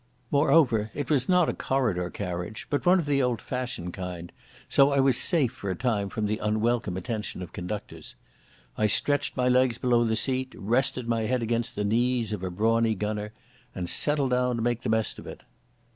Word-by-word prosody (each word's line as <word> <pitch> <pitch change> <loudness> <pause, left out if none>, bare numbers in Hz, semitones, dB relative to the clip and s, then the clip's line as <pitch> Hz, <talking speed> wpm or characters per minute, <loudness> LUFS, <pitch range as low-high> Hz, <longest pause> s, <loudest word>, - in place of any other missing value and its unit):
Moreover 140 -7 +3
it 145 +1 -3
was 130 -4 +2
not 180 -3 +4
a - - 0
corridor 110 -10 -1
carriage, 90 +3 -5
but 145 +4 -1
one 185 +1 +6
of 170 - -1
the 140 -1 +2
old 125 -3 0
fashioned 125 -9 -4
kind, 90 -2 -6 0.4
so 140 +1 +4
I 140 - +2
was 135 -1 +4
safe 150 -9 +2
for 115 -6 -6
a 95 - -1
time 105 -3 -1
from 110 +2 -3
the 105 +1 -1
unwelcome 110 -2 0
attention 105 -1 -4
of 90 - -11
conductors. 95 +4 -6 0.6
I 110 - +3
stretched 145 +8 +1
my 125 0 +2
legs 125 -1 +3
below 120 -1 +2
the 110 -1 +1
seat, 130 +3 -1
rested 125 +3 0
my 115 -2 0
head 125 0 0
against 115 +1 -1
the 105 - -1
knees 115 0 +1
of 105 - -4
a 95 - -2
brawny 110 +4 +1
gunner, 105 +1 -3 0.4
and 90 -2 -3
settled 145 - +1
down 125 0 +1
to 115 - -2
make 120 0 0
the - - -3
best 110 0 0
of - - -11
it. - - -9
115 Hz, 200 wpm, -27 LUFS, 105-130 Hz, 0.6 s, one